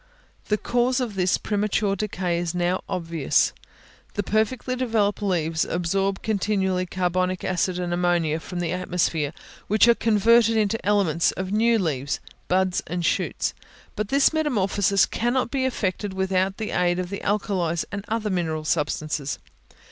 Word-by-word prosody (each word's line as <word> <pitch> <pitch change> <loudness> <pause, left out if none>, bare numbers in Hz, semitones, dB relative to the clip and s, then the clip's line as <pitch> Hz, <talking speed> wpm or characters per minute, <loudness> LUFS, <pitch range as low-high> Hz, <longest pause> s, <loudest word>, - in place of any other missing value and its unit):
The 210 - +2
cause 245 +3 +1
of 245 -5 -2
this 185 -2 +2
premature 205 -1 0
decay 185 -4 -2
is 175 -1 -3
now 180 +1 0
obvious. 165 -4 +1 0.6
The 205 - 0
perfectly 220 +5 0
developed 225 -5 0
leaves 165 -5 0
absorb 195 +3 -1
continually 190 -3 0
carbonic 185 0 -1
acid 185 0 0
and 175 -1 -2
ammonia 175 -3 +1
from 175 +2 -5
the 170 -2 -1
atmosphere, 175 -5 0 0.4
which 215 +3 +4
are 235 - +7
converted 225 +1 +4
into 215 +1 0
elements 185 -5 +2
of 190 0 -4
new 230 +2 +3
leaves, 145 -8 -1 0.3
buds, 185 0 +1
and 175 0 -2
shoots; - - 0 0.4
but 210 - -2
this 275 +6 +3
metamorphosis 200 - +2
cannot 240 +1 -1
be 265 -2 0
effected 205 -5 -2
without 190 0 0
the 220 - -4
aid 175 0 +1
of 180 0 -3
the 200 - -4
alkalies, 185 -5 0
and 200 0 -4
other 220 -2 -1
mineral 160 -4 -1
substances. 150 -2 -1
190 Hz, 150 wpm, -24 LUFS, 175-215 Hz, 0.6 s, are